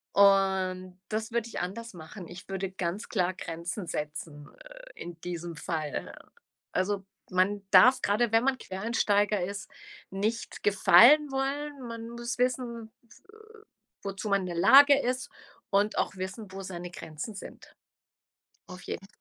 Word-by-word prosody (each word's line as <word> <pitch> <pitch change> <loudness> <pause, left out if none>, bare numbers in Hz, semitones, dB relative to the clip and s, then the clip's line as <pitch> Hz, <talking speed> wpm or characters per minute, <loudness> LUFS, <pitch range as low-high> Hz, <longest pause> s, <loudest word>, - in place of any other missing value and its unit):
Und 190 -2 +3
das 220 +1 -3
würde 235 -1 -1
ich - - -5
anders 230 +6 -5
machen. 175 +2 -10
Ich 180 +3 -11
würde 195 0 -3
ganz 185 +2 -3
klar 185 -4 0
Grenzen 175 +2 -6
setzen, 150 -1 -5
äh, - - -13
in 175 -1 -8
diesem 175 -1 -5
Fall. 155 -2 -4 0.6
Also, 195 +1 -1 0.2
man 190 +2 +1
darf 245 +8 +7
gerade, 215 +3 +1
wenn 225 +1 +5
man 265 0 +1
Quereinsteiger 205 -1 0
ist, 195 +2 -5 0.4
nicht 210 +4 -3
gefallen 240 - +7
wollen. 275 0 -3
Man 230 0 -7
muss 235 0 -5
wissen, 245 -3 -1
äh, 240 - -20 0.7
wozu 195 +2 -5
man 200 -1 +3
in 185 - -4
der 175 - -4
Lage 275 +11 +7
ist 255 -1 -2 0.4
und 200 +2 +1
auch - - 0
wissen, 190 +2 -6
wo 195 +1 -7
seine 175 -2 -7
Grenzen 165 +5 -7
sind. - - -11 0.9
Auf 180 -1 -10
jeden 195 - -6
200 Hz, 145 wpm, -29 LUFS, 180-235 Hz, 0.9 s, darf